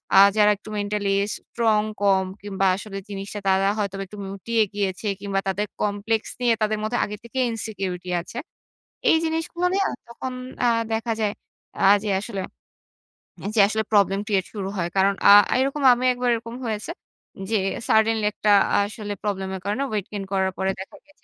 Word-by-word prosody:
আ - - +7 0.2
যারা 210 0 +6
একটু 210 - -13
mentally 205 -1 -1 0.2
strong 220 -2 +1 0.2
কম 195 -2 +3 0.2
কিংবা 195 -1 -2
আসলে 195 0 -7
জিনিসটা 200 +1 -5
তারা 190 +1 +3
হয়তো 200 -1 -2
একটু 210 +3 -11
মুটিয়ে 220 +3 0
গিয়েছে 200 0 -2
কিংবা 200 -1 -1
তাদের 205 +2 -1
complex 210 +2 0 0.2
নিয়ে 240 -2 +4
তাদের 215 0 +1
মধ্যে 220 +3 -1
আগে 210 0 -6
থেকেই 255 +2 -1
insecurity 195 -5 -4
আছে। 230 - -11 0.7
এই 325 - +6
জিনিসগুলা 325 +2 -1
নিয়া 390 0 +2 0.2
তখন 255 +2 -6 0.3
অ্যা 245 - +4 0.2
দেখা 225 +1 -1
যায়, 210 -1 +1 0.5
আ - - +7 0.2
যে, 210 - -2
আসলে, 200 -3 -5 1.0
অ্যা - - -5
যে, - - +3
আসলে 220 0 0
প্রবলেম 200 -1 +4
ক্রিয়েট 195 -4 +1
শুরু 195 -2 -4
হয়। 170 -1 -1
কারণ 195 +1 +4 0.2
আ - - +10 0.3
এরকম 275 +2 -1
আমি 245 +1 -3
একবার 245 0 -1
এরকম 230 +1 -7
হয়েছে, 220 +7 -3 0.6
যে, 225 - +2 0.3
suddenly 220 0 +3
একটা 210 - +1 0.3
আ - - +4
আসলে 210 -1 -6
প্রবলেম 195 -2 -2
এর 185 - -7
কারণে 210 +7 -1
ওয়েট 205 -3 -1
গেইন 200 -2 -4
করার 190 -1 +1
পরে 190 0 0
দেখা 190 - -8
গেছে 295 0 -27
210 Hz, 175 wpm, -24 LUFS, 195-225 Hz, 1.0 s, আ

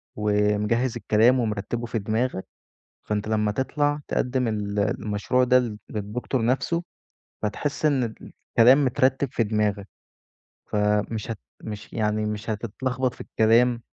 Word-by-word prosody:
ومجهّز 105 +3 +1
الكلام 115 +4 +4
ومرتّبه 115 +1 -2
في 115 0 -2
دماغك، 110 0 -1 0.6
فأنت 105 0 -2
لمَّا 105 -1 +1
تطلع 145 +5 0
تقدّم 125 -1 0
ال 105 -2 -2
المشروع 105 +5 0
ده 125 0 +5
للد 115 -4 -4
للدكتور 110 +3 -2
نفسه، 155 +7 0 0.6
هتحس 140 +9 -2
إن 140 -4 +3 0.5
الكلام 130 +5 +7
مترّتب 130 +2 +2
في 115 - +1
دماغك، 105 -2 -1 0.8
فمش 105 +1 0
هت 115 - -4 0.2
مش 105 -1 -7
يعني 105 -1 0
مش 105 +1 -4
هتتلخبط 125 +4 -2
في - - -21
الكلام، 115 +2 +3
110 Hz, 125 wpm, -25 LUFS, 105-125 Hz, 0.8 s, الكلام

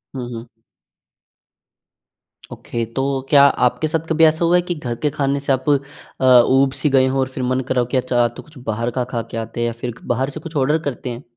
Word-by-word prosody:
हुँ, 125 -2 -5
हुँ। 115 +1 -8 2.0
Okay. 115 -1 -4
तो 135 0 -1
क्या 140 -2 +7 0.2
आपके 155 +5 0
साथ 165 +1 -2
कभी 160 0 +3
ऐसा 160 +2 +2
हुआ 175 +1 +3
है 180 - +4
कि 175 0 -4
घर 125 -6 -4
के 150 - +3
खाने 140 -1 -1
से 140 0 -2
आप 130 +2 -2
अ, 140 -1 -2 0.2
ऊब-सी 135 +3 +2
गए 130 -1 +4
हों, 135 +1 0
और 130 0 0
फिर 130 - -3
मन 130 +1 0
करा 130 - +1
हो - - 0
कि 135 - +1
अच्छा, 125 -1 +1
आज 120 - 0
तो - - -8
कुछ 150 -2 -18
बाहर 115 +2 -1
का 125 +1 -1
खा 120 -2 -1
के 115 - -5
आते 115 +1 -4
या 120 - 0
फिर 120 -2 -3 0.2
बाहर 130 +3 -1
से 145 - -8
कुछ 160 0 -10
ऑर्डर 145 +3 +2
करते 130 -2 -4
हैं? 120 +2 -7
135 Hz, 230 wpm, -20 LUFS, 125-150 Hz, 2.0 s, क्या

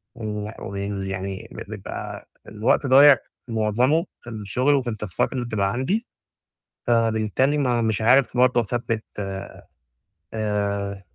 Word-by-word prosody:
وال 105 -1 -5
وال 100 0 -4
يعني 95 0 -5
بيبقى - - -7 0.2
الوقت 110 +6 +1
ضايع 135 +1 +8 0.3
معظمه 120 +8 +2 0.2
في 120 - -10
الشُغل 115 +6 0
وفي 130 -3 0
التاسكات 105 +1 -2
اللي 125 -2 -2
بتبقى 100 -4 0
عندي. 190 - -1 0.8
فبالتالي 115 +4 +2
ما 120 -4 +1
مش 110 -1 0
عارف 125 +2 +4
برضو 125 -1 +4
أثبِّت، 115 0 -2 1.3
آآ، 100 -2 -2
115 Hz, 115 wpm, -23 LUFS, 105-125 Hz, 1.3 s, ضايع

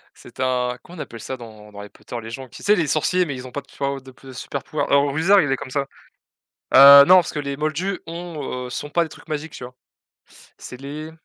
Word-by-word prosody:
C'est - - -14
un 125 -1 0
comment 175 0 -14
on - - -7
appelle 115 -5 -8
ça 130 - -6
dans 110 -3 -13
dans 100 - -12
Harry 105 0 -8
Potter, 120 - -10
les 110 - -8
gens 130 +2 -8
qui, - - -13
tu - - -13
sais, 205 - +5
les 170 -6 0
sorciers 155 +5 +1
mais 145 -5 -5
ils 130 0 -8
ont 125 - -12
pas, 145 - -5
tu 140 - -21
vois, 140 -1 -1
au 135 - -6
d 130 0 -14
de 135 -1 -11
supers 130 +2 -6
pouvoirs. 155 - -3
Alors 140 0 +4
Wizard, 180 +7 +4
il 145 - 0
est 135 - +1
comme 130 - -9
ça. 140 +1 -2 0.9
Heu, 140 +1 +10
non 185 - +7
parce 180 -3 +3
que - - -3
les 140 -1 -4
moldus 165 +6 -2
ont, 165 -7 -6
heu, - - -6
s 125 - -5
ont 145 - -8
pas 170 +3 +1
des 165 - -8
trucs - - -15
magiques, 155 +1 -5
tu - - -9
vois? 125 +1 -10 0.8
C'est 125 - -10
les 150 +3 -7
140 Hz, 275 wpm, -21 LUFS, 130-155 Hz, 0.9 s, Heu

